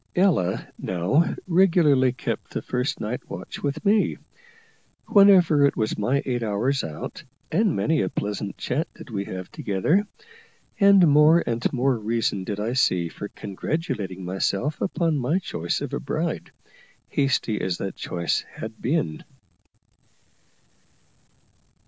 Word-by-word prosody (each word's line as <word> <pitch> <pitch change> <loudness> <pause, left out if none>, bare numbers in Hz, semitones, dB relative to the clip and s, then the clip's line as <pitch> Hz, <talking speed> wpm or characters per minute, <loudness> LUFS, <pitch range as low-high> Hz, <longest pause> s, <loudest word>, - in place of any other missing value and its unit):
Ella 170 - +2
now 95 - +1
regularly 165 -8 +4
kept - - -4
the - - -2
first 125 +3 -2
night 115 +4 -3
watch - - -7
with 145 +5 -3
me, 205 +1 +3 0.9
whenever 185 -7 +6
it 140 - +3
was 110 0 0
my 125 +7 0
eight 125 -2 -1
hours 115 +6 0
out, 80 -2 -7 0.3
and 210 -4 +2
many 160 -1 +1
a - - 0
pleasant 100 -1 -4
chat 155 +6 -2
did 130 - -12
we 100 -2 -3
have 95 -1 -7
together; 150 - 0 0.7
and 200 -3 +7
more 150 +3 +6
and 115 0 -1
more 130 +1 +1
reason 110 -3 -1
did 100 +2 -4
I 110 +3 -1
see 90 -9 +2
for 105 - -7
congratulating 100 - -4
myself 95 - -1
upon 170 -4 0
my 140 +6 +1
choice 85 - -3
of - - -5
a - - -1
bride, - - -3 0.6
hasty 135 -5 0
as 90 -2 -1
that 95 - -4
choice 85 -1 -1
had 110 0 -8
been. 120 - -1
125 Hz, 135 wpm, -24 LUFS, 100-160 Hz, 0.9 s, and